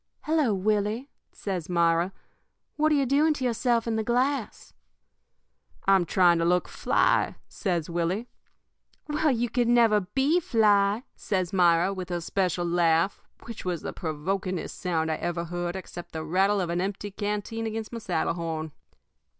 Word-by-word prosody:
"'Hello, 305 -6 +1
Willie!' 210 +6 0 0.2
says 185 -5 -4
Myra. 170 +1 +2 0.6
'What 310 +1 +2
are - - +4
you 280 -1 +2
doing 295 +4 +3
to 265 - -5
yourself 235 -1 +1
in 225 -1 -1
the 220 - 0
glass?' 250 +1 -1 1.1
"'I'm 195 -2 +5
trying 175 -1 +4
to - - +1
look 180 +1 +2
fly,' - - +1
says 175 -6 -2
Willie. 175 +7 -1 0.8
"'Well, 300 +1 +1
you 240 -2 +1 0.2
never 230 -3 +4
could 185 +2 -15
be 285 +6 +3
fly,' 210 - +3
says 185 -3 -2
Myra, 175 0 +4
with 185 -1 -6
her 175 -1 -1
special 180 0 -1
laugh, 170 +1 +2 0.2
which 230 -2 -8
was 180 -3 -3
the - - -4
provokingest 180 +3 -3
sound 160 -3 -1
I 155 - -1
ever 170 0 -3
heard 175 +1 -3
except 175 -2 -8
the 160 -1 -4
rattle 195 +5 +2
of 175 -2 -1
an 175 +1 0
empty 200 +1 -4
canteen 210 +2 -3
against 220 +1 -5
my 230 - -4
saddle 175 -6 -1
horn. 160 -2 -4
195 Hz, 160 wpm, -27 LUFS, 175-225 Hz, 1.1 s, I'm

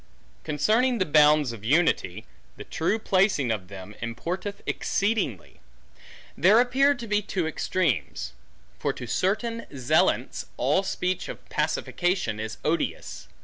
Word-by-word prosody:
Concerning 225 - +2
the 185 - +1
bounds 150 -3 +5
of 115 -3 -10
unity; 120 - +1 0.3
the - - -7
true 170 +7 -1
placing 190 - +2
of 100 -5 -3
them, 95 +1 -10
importeth 175 - -4
exceedingly. 200 - -1 0.8
There 200 +7 +5
appear 270 +3 +3
to 240 - -7
be 210 0 +1
two 190 -4 -2
extremes. 160 - -1 0.5
For - - -1
to - - -7
certain 215 - -1
zealants, 140 +3 +1
all 140 +9 +2
speech 185 -1 -2
of - - -9
pacification 175 - -1
is 110 0 -5
odious. 165 +2 -2
170 Hz, 125 wpm, -26 LUFS, 125-205 Hz, 0.8 s, bounds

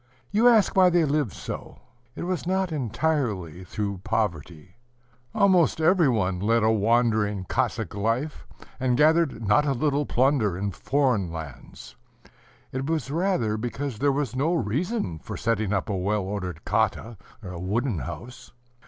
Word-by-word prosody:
You 220 +4 +4
ask 225 -4 +4
why 185 -1 +6
they 175 -2 +3
lived 145 -6 0
so? - - -7 0.4
It - - -5
was 180 -1 -3
not 190 -1 0
entirely 120 - -2
through 100 +1 -4
poverty: 85 -7 -3 0.5
almost 185 -5 +3
every 165 -1 +4
one 95 -6 0
led 115 +3 +2
a 110 - +4
wandering, 110 -2 +1
Cossack 115 -3 -1
life, 115 +9 -2 0.3
and 125 -2 +1
gathered 155 -6 +3
not 145 +9 +4
a 140 - +2
little 145 +2 0
plunder 125 -8 +2
in 100 +1 -2
foreign 125 -6 0
lands; 75 -5 -9 0.8
it 130 +1 -3
was 160 -4 -1
rather 155 - 0
because 120 +1 -4
there 145 0 +3
was 135 -4 -2
no 155 +7 +1
reason 140 - -2
for - - -7
setting 110 -3 0
up 95 +1 0
a 105 - -2
well 100 +2 0
ordered 95 -4 -5
khata 110 +1 0 0.3
(wooden 95 - -2
house). 120 - -8
120 Hz, 145 wpm, -25 LUFS, 100-150 Hz, 0.8 s, why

